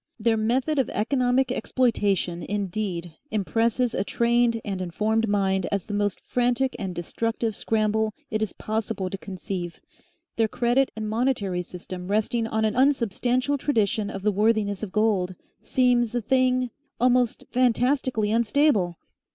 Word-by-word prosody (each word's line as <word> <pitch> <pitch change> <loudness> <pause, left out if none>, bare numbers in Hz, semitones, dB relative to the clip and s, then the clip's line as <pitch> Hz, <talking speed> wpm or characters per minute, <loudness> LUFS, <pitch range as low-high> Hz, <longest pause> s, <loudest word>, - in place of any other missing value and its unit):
Their 225 +1 +2
method 255 +7 +1
of 265 - +1
economic 250 +3 +1
exploitation 200 -8 0
indeed 190 -4 -3 0.2
impresses 230 +3 +1
a 190 - 0
trained 235 +1 +2
and 195 -3 -3
informed 215 +6 0
mind 195 -2 +1
as 200 -3 -1
the 210 - -6
most 205 -1 0
frantic 250 +1 0
and 190 -3 -4
destructive 225 +5 -2
scramble 215 0 0 0.2
it 215 0 -1
is 215 - -1
possible 215 -3 -3
to 195 - -3
conceive; 185 -3 -5 0.6
their 225 -1 +3
credit 245 +4 +2
and 220 -1 -4
monetary 215 -5 0
system 180 0 -8
resting 220 +3 0
on 220 0 0
an 215 - 0
unsubstantial 255 +1 +1
tradition 220 -6 +1
of 195 -2 -6
the 210 - +3
worthiness 205 -1 +1
of 215 -4 -5
gold, 200 -4 +1 0.3
seems 245 -2 +2
a 240 - +1
thing 255 +1 +2 0.3
almost 250 -1 +2
fantastically 250 -2 +2
unstable. 225 - +2
220 Hz, 140 wpm, -25 LUFS, 200-245 Hz, 0.6 s, their